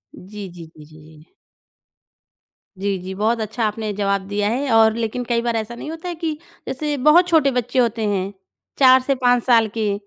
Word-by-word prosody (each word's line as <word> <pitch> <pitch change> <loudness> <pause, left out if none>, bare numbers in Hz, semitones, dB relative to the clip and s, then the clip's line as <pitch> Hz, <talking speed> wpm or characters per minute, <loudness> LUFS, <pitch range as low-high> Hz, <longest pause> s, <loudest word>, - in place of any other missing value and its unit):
जी, 200 +1 -9
जी, 175 -1 -11
जी, 150 -1 -14
जी, 155 +1 -17 0.2
जी। 155 - -21 1.4
जी, 195 0 -1
जी 185 +1 -7
बहुत 225 +3 0
अच्छा 220 +2 -3
आपने 215 0 -4
जवाब 200 -1 -1
दिया 205 0 -1
है 265 +4 -2
और 220 -1 +5
लेकिन 235 +2 -3
कई 235 -1 +1
बार 235 -1 -1
ऐसा 225 +1 -3
नहीं 300 - -8
होता 325 +2 -8
है 350 - -4
कि 325 -1 -3 0.3
जैसे 295 +2 -2
बहुत 345 +4 +6
छोटे 315 -5 +3
बच्चे 250 +1 -1
होते 230 -2 +1
हैं, 195 -1 -2 0.4
4 260 -1 +6
से 275 +2 0
5 245 -2 +2
साल 230 -3 +4
के, 210 -2 0
225 Hz, 195 wpm, -20 LUFS, 205-260 Hz, 1.4 s, बहुत